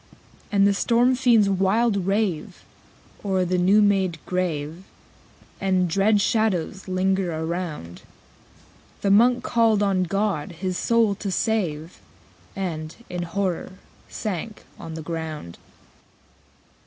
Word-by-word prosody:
_70 -, -, -31 dB
13. -, -, -24 dB, 0.3 s
And 200 Hz, 0 st, +5 dB
the 200 Hz, -, +3 dB
storm 240 Hz, +5 st, +3 dB
fiends 240 Hz, -5 st, +4 dB
wild 195 Hz, +1 st, +1 dB
rave 195 Hz, -6 st, -1 dB, 0.6 s
O'er 190 Hz, -2 st, +1 dB
the 180 Hz, +1 st, 0 dB
new 200 Hz, +4 st, +5 dB
made 190 Hz, -4 st, +2 dB
grave, 170 Hz, -2 st, -2 dB, 0.8 s
And 185 Hz, -2 st, +1 dB
dread 200 Hz, +4 st, +3 dB
shadows 200 Hz, -4 st, 0 dB
linger 190 Hz, 0 st, 0 dB
around. 160 Hz, -, -5 dB, 1.0 s
The 200 Hz, -, +2 dB
Monk 245 Hz, +4 st, +4 dB
called 225 Hz, -3 st, +2 dB
on 195 Hz, -2 st, +2 dB
God 195 Hz, -4 st, -1 dB
his 185 Hz, +2 st, -3 dB
soul 230 Hz, +1 st, +2 dB
to 200 Hz, 0 st, -5 dB
save, 175 Hz, -5 st, -2 dB, 0.5 s
And, 165 Hz, -5 st, -4 dB, 0.2 s
in 180 Hz, 0 st, -3 dB
horror, 185 Hz, +1 st, -2 dB, 0.4 s
sank 210 Hz, +1 st, -5 dB, 0.2 s
on 160 Hz, -1 st, -7 dB
the 160 Hz, -, -6 dB
ground. 155 Hz, -, -6 dB
190 Hz, 120 wpm, -24 LUFS, 170-210 Hz, 1.0 s, And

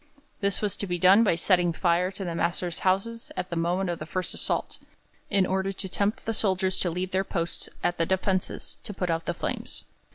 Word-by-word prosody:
This 200 Hz, -1 st, 0 dB
was 205 Hz, -2 st, 0 dB
to 200 Hz, -, -3 dB
be 175 Hz, -1 st, 0 dB
done 190 Hz, +5 st, +7 dB
by 200 Hz, -, +3 dB
setting 175 Hz, 0 st, +3 dB
fire 175 Hz, +1 st, +2 dB
to 195 Hz, 0 st, -6 dB
their 170 Hz, -, -2 dB
masters' 170 Hz, 0 st, -1 dB
houses 195 Hz, +5 st, 0 dB
at 185 Hz, 0 st, -3 dB
the -, -, -1 dB
moment 175 Hz, +3 st, +1 dB
of 170 Hz, -, -4 dB
the 155 Hz, -, -6 dB
first 185 Hz, +1 st, -2 dB
assault, -, -, -2 dB, 0.5 s
in 195 Hz, -2 st, +4 dB
order 190 Hz, +1 st, 0 dB
to 190 Hz, 0 st, -4 dB
tempt 200 Hz, +3 st, -1 dB
the 225 Hz, -, 0 dB
soldiers 190 Hz, -3 st, +2 dB
to 180 Hz, -, +1 dB
leave 180 Hz, +2 st, -3 dB
their 190 Hz, +1 st, +2 dB
posts 170 Hz, -3 st, -3 dB
at 175 Hz, -, +1 dB
the 165 Hz, -, +2 dB
defences, 190 Hz, 0 st, -1 dB
to 205 Hz, -, -6 dB
put 180 Hz, -2 st, -1 dB
out 165 Hz, 0 st, -1 dB
the 175 Hz, -, -1 dB
flames. -, -, -3 dB
185 Hz, 220 wpm, -27 LUFS, 175-195 Hz, 0.5 s, done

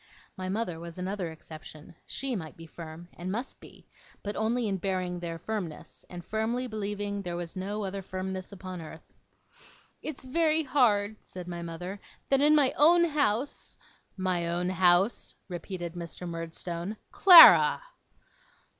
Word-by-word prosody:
My 185 Hz, 0 st, -5 dB
mother 190 Hz, -5 st, -2 dB
was 170 Hz, 0 st, -9 dB
another 185 Hz, -1 st, -3 dB
exception. 155 Hz, -1 st, -12 dB
She 270 Hz, -2 st, -2 dB
might 160 Hz, -6 st, -7 dB
be 165 Hz, -, -10 dB
firm, 165 Hz, +1 st, -10 dB
and 180 Hz, +2 st, -6 dB
must 235 Hz, +6 st, -4 dB
be; -, -, -15 dB, 0.4 s
but 205 Hz, 0 st, -4 dB
only 230 Hz, +1 st, 0 dB
in 195 Hz, -2 st, -1 dB
bearing 185 Hz, -1 st, -2 dB
their 170 Hz, -1 st, -5 dB
firmness, 175 Hz, -3 st, -6 dB
and 175 Hz, -1 st, -9 dB
firmly 225 Hz, +4 st, -1 dB
believing 205 Hz, -2 st, -4 dB
there 175 Hz, -3 st, -5 dB
was 175 Hz, 0 st, -6 dB
no 205 Hz, +3 st, -3 dB
other 195 Hz, 0 st, -4 dB
firmness 185 Hz, 0 st, -5 dB
upon 185 Hz, -2 st, -8 dB
earth. 160 Hz, 0 st, -13 dB, 0.8 s
'It's 310 Hz, -4 st, -5 dB
very 315 Hz, +4 st, +1 dB
hard,' 220 Hz, -7 st, +2 dB
said 180 Hz, -1 st, -9 dB
my 175 Hz, -1 st, -5 dB
mother, 175 Hz, +4 st, -6 dB, 0.3 s
'that 275 Hz, 0 st, +3 dB
in 300 Hz, +1 st, +5 dB
my 280 Hz, -3 st, +4 dB
own 340 Hz, +4 st, +6 dB
house 285 Hz, -5 st, -1 dB, 0.2 s
' -, -, -39 dB
'My 180 Hz, -2 st, -1 dB
own 175 Hz, +2 st, -1 dB
house?' 185 Hz, +3 st, +2 dB
repeated 175 Hz, -1 st, -6 dB
Mr. 175 Hz, +1 st, -7 dB
Murdstone. 170 Hz, +3 st, -5 dB
'Clara! 365 Hz, +6 st, +9 dB
190 Hz, 150 wpm, -28 LUFS, 175-220 Hz, 0.8 s, Clara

